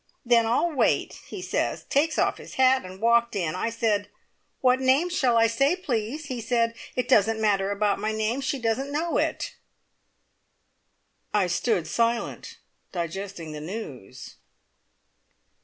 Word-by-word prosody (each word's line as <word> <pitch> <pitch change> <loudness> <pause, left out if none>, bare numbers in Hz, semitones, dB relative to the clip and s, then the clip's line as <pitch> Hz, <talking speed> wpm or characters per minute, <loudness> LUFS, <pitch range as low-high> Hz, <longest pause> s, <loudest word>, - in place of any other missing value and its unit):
`Then 235 -1 +5
I'll 245 +10 +1
wait!' 280 - +1
he 370 - -7
says, - - -1
takes 310 +3 +1
off - - +1
his - - -11
hat, 260 0 +4
and 185 +1 -10
walked 235 +1 +3
in. 170 -6 -1
I 185 +5 -1
said, 220 -3 0 0.5
`What 255 0 +4
name 265 +7 +3
shall 255 -9 +2
I 230 - +5
say, 275 +8 +2
please?' 275 - -3
He 255 -4 -4
said, 230 0 +1 0.2
`It 250 -1 0
doesn't 225 -3 +4
matter 200 -3 +2
about 205 0 0
my 215 - -1
name. 220 +4 -1
She 275 +1 -1
doesn't 255 +3 -1
know 325 +4 0
it.'" - - -2 1.8
I 205 -3 +4
stood 180 0 0
silent, 230 +7 -1 0.3
digesting 175 -1 -5
the 150 -1 -7
news. 155 - -8
230 Hz, 145 wpm, -26 LUFS, 205-260 Hz, 1.8 s, `Then